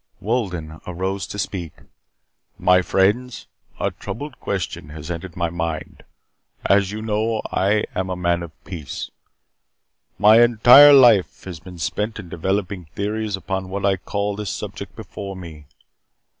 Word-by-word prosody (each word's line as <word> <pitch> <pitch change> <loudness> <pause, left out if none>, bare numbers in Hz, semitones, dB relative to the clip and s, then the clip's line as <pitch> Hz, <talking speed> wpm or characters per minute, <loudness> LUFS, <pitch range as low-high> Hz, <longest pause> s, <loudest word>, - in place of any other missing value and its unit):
Wolden 90 -9 -3
arose 95 +2 -3
to - - -7
speak. 90 -5 -4 0.8
"My 90 0 +4
friends, 115 +6 +1 0.3
a - - 0
troubled 145 -4 -7
question 90 -6 -4
has 80 +2 -7
entered 85 +1 -6
my 85 -1 -1
mind. 85 -2 -4 0.6
As 100 -1 +3
you 110 +1 -5
know, 110 +1 0
I 105 +2 +2
am 95 0 -2
a 90 - -2
man 85 -1 0
of 85 -2 -7
peace. 85 -7 -7 1.1
My 110 +2 +7
entire 120 +5 +8
life 120 -8 +5
has 90 -4 -7
been 90 +1 -12
spent 105 +6 -2
in 100 -5 -9
developing 95 +1 -2
theories 105 0 -2
upon 95 0 -4
what 100 +1 -3
I 100 -1 +3
call 100 +2 -3
this 105 -1 -4
subject - - -6
before 100 -1 -7
me. 80 -5 -10
95 Hz, 145 wpm, -21 LUFS, 85-105 Hz, 1.1 s, entire